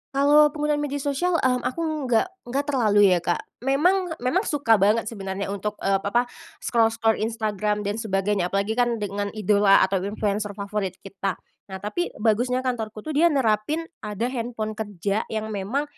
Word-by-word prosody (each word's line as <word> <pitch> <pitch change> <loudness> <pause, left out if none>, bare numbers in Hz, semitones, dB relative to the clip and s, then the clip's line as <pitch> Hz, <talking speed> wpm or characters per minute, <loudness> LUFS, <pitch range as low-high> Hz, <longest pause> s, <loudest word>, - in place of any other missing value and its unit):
Kalau 295 +2 +6
penggunaan 300 -1 0
media 285 -1 -3
sosial, 335 +5 0
mmm, 255 -4 +2
aku 310 -1 -3
nggak 235 +8 +3 0.2
nggak 275 +4 -1
terlalu 210 -8 +4
ya, 180 - +4
Kak. 175 0 -1 0.2
Memang 345 - +2 0.2
memang 345 +11 +1
suka 250 -8 +3
banget 210 +4 +3
sebenarnya 195 -3 -4
untuk 205 +1 -3
ep 195 0 +2
apa, 235 +5 +2 0.4
scroll-scroll 225 -1 +2
Instagram 215 -2 -1
dan 205 +2 -2
sebagainya. 195 -3 0
Apalagi 200 +3 -1
kan 240 0 +1
dengan 205 0 -2
idola 205 -1 +4
atau 190 0 +1
influencer 205 +1 -2
favorit 200 -2 -3
kita. 195 0 -3 0.3
Nah, 190 0 -8
tapi 280 +13 -1
bagusnya 245 +4 +1
kantorku 220 -4 -3
tuh 310 - -4
dia 310 +3 +4
nerapin 270 +1 +1 0.2
ada 215 +4 -3
handphone 230 -3 -3
kerja 205 -1 -3
yang 220 0 -4
memang 210 +8 -1
220 Hz, 160 wpm, -24 LUFS, 205-260 Hz, 0.4 s, Kalau